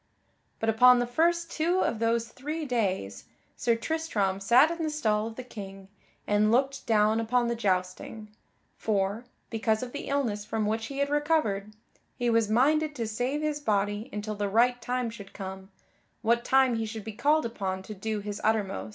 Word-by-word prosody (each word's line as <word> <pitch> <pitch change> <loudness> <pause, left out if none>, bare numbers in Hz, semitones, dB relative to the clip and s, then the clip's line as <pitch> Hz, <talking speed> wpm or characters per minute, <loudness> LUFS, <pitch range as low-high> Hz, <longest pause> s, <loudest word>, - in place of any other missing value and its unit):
But 225 - -2
upon 250 +3 +7
the 245 - +1
first 335 +7 +1
two 345 +4 +1
of 225 - 0
those 230 0 +1
three 300 +6 -5
days 190 - -2 0.3
Sir 235 -1 +1
Tristram 230 -9 -1
sat 245 +10 +5
in 335 0 -4
the 315 - 0
stall 220 -8 0
of 225 - -8
the 255 - -6
King 195 -5 -9 0.4
and 210 +1 +3
looked 270 +3 +1
down 215 0 +3
upon 240 +2 +1
the 235 - 0
jousting, 195 +1 -2 0.5
for, 205 +2 -1 0.3
because 220 0 0
of 245 - -6
the 285 - -6
illness 240 -8 -1
from 215 0 -2
which 220 +2 -1
he 275 - -7
had 280 0 0
recovered, 295 -10 0 0.4
he 245 -2 0
was 225 -2 +2
minded 300 +6 +2
to 235 -4 -2
save 245 +7 -2
his 300 -1 -1
body 205 -2 -1
until 210 +1 -4
the 205 -1 -2
right 245 +4 +3
time 245 -1 -2
should 200 -4 -11
come, 190 0 -7 0.5
what 235 +1 +2
time 260 -2 +3
he 225 - -1
should 220 -1 -6
be 220 - -6
called 290 +7 +2
upon 190 -5 -3
to 215 - -8
do 210 +1 -3
his 205 0 -5
uttermost. 210 -3 0
225 Hz, 185 wpm, -28 LUFS, 210-260 Hz, 0.5 s, upon